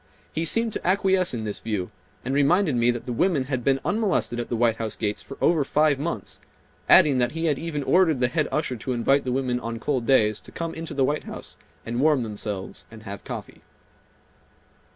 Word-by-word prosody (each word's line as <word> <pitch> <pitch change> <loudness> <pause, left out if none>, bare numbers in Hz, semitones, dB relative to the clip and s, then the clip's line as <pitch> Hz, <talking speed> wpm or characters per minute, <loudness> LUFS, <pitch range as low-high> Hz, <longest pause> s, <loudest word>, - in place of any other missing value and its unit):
He 160 +1 -1
seemed 230 +6 +1
to - - -5
acquiesce 190 -1 +2
in 115 -3 -4
this 105 -1 -4
view, 105 -5 -3 0.3
and 130 - -1
reminded 150 +3 +3
me 120 0 +3
that 120 -1 -2
the 125 - -3
women 155 +1 +2
had 130 -2 -3
been 135 +1 +2
unmolested 155 - 0
at 120 - -4
the 120 - -1
White 115 -1 +2
House 110 -2 -3
gates 105 -1 -2
for 135 - -10
over 165 -4 +3
five 150 0 +2
months, 170 +4 -4 0.5
adding 140 -4 +7
that 120 +1 +1
he 165 +1 -2
had 150 -4 +1
even 155 -3 -3
ordered 165 -3 +3
the 125 - +3
head 155 +4 0
usher 150 -4 -1
to 125 +3 -3
invite 135 +4 +2
the 125 - -1
women 125 -1 0
on 115 -1 -5
cold 125 0 -2
days 110 -6 +3
to - - -13
come 165 -1 -4
into 165 0 -6
the 135 -1 +3
White 150 +3 -1
House - - -8 0.3
and 120 +2 -2
warm 150 -4 +3
themselves 105 -3 -5
and 110 -1 -13
have 100 -2 -7
coffee. - - -8
130 Hz, 215 wpm, -25 LUFS, 115-155 Hz, 0.5 s, adding